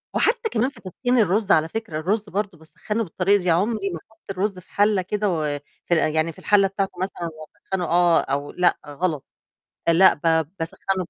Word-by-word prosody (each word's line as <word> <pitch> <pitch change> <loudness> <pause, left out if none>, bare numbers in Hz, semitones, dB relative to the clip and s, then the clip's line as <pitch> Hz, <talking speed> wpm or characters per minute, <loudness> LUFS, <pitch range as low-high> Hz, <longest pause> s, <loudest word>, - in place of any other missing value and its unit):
وحتى 460 0 +2
كمان 235 +4 +1
في 280 - -17
تسخين 245 +7 -1
الرُز 205 0 +2
على 160 +1 +4
فكرة 220 -6 -4
الرُز 205 +5 -1
برضه 200 -3 -3
باسخّنه 210 +8 -4
بالطريقة 195 +2 +2
دي، 180 - -1
عُمري 200 +4 +1
ما 170 -3 -5
أحط 220 - -27
الرُز 195 0 -2
في 180 - -20
حلّة 205 -1 +3
كده 210 +3 -1
و 165 -4 -1 0.4
في - - +1
ال 160 -2 +2
يعني 155 +1 +1
في - - -16
الحلّة 200 -1 +4
بتاعته 195 0 -2
مثلًا 180 -3 -3
وأسخّنه 180 +3 -5
آه 175 0 +4
أو 140 +1 -3
لأ، 180 -1 +2
غلط 150 0 -2 0.6
لأ، 170 +3 +6
ب 150 - -16 0.4
باسخّنه 185 +3 -2
185 Hz, 190 wpm, -23 LUFS, 165-210 Hz, 0.6 s, لأ